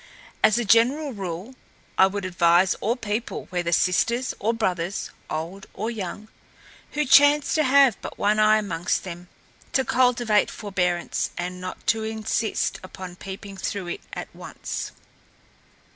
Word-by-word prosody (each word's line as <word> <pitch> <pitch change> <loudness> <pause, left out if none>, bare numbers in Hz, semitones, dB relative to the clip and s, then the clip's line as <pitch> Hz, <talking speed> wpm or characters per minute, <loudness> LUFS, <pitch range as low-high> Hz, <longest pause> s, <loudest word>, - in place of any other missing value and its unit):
As 215 - +5
a 240 - 0
general 260 +7 +3
rule, 190 +3 -5 0.4
I 190 - +6
would 200 0 -4
advise 175 0 +4
all 230 +3 +1
people, 220 -1 -3
whether 175 -2 -1
sisters 235 +9 +2
or 220 - +1
brothers, 190 -5 -2 0.2
old 170 +5 -5
or 220 +3 -2
young, 210 -1 -6 0.7
who 300 0 0
chance 290 +2 +6
to 310 - +3
have 270 -4 +5
but - - -7
one 210 +1 +2
eye 215 0 +6
amongst 180 -5 -1
them, 175 -1 -8 0.4
to 265 - +2
cultivate 240 -4 +3
forbearance 180 -4 -1
and 180 +1 -4
not 185 +4 -1
all 220 - -4
insist 220 0 -1
upon 185 -1 -9
peeping 195 +1 -8
through 190 -1 -3
it - - -5
at - - -7
once. - - -6
205 Hz, 145 wpm, -24 LUFS, 180-235 Hz, 0.7 s, I